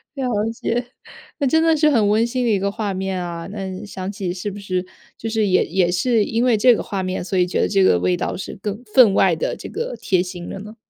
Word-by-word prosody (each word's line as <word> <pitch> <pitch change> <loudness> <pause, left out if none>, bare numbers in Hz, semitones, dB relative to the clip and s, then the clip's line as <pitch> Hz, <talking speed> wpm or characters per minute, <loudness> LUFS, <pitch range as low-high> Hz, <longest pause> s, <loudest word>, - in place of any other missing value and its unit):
了 270 -2 -2 0.3
解， 240 +1 -2 0.5
那 280 - +1
真 320 +5 +3
的 325 -1 +4
是 305 0 +4
很 220 -8 +3
温 220 +2 +3
馨 250 +1 -2
的 230 - +2
一 200 - +2
个 200 +1 -1
画 205 -2 -3
面 190 -1 -3
啊， 170 0 -6
那 190 -2 -6
想 190 -1 -5
起 190 -4 -4
是 190 +3 -4
不 205 - -8
是 185 -2 -2 0.3
就 225 - -4
是 220 -2 +1
也 185 - +3
也 180 0 +1
是 220 +4 +2
因 230 +2 0
为 240 -4 +3
这 245 +2 +6
个 - - -3
画 195 -2 -3
面， 185 -1 -3
所 190 +1 -2
以 180 - +4
觉 - - 0
得 - - +2
这 195 -2 +3
个 90 - +5
味 90 0 +1
道 - - -2
是 185 - -7
更 210 +4 -4
分 240 -7 +7
外 185 -4 +4
地 - - -2
这 - - -8
个 480 +2 -4
贴 185 -2 +1
心 180 -1 -6
的 - - -6
呢？ 210 +2 -10
200 Hz, 280 characters per minute, -21 LUFS, 185-230 Hz, 0.5 s, 分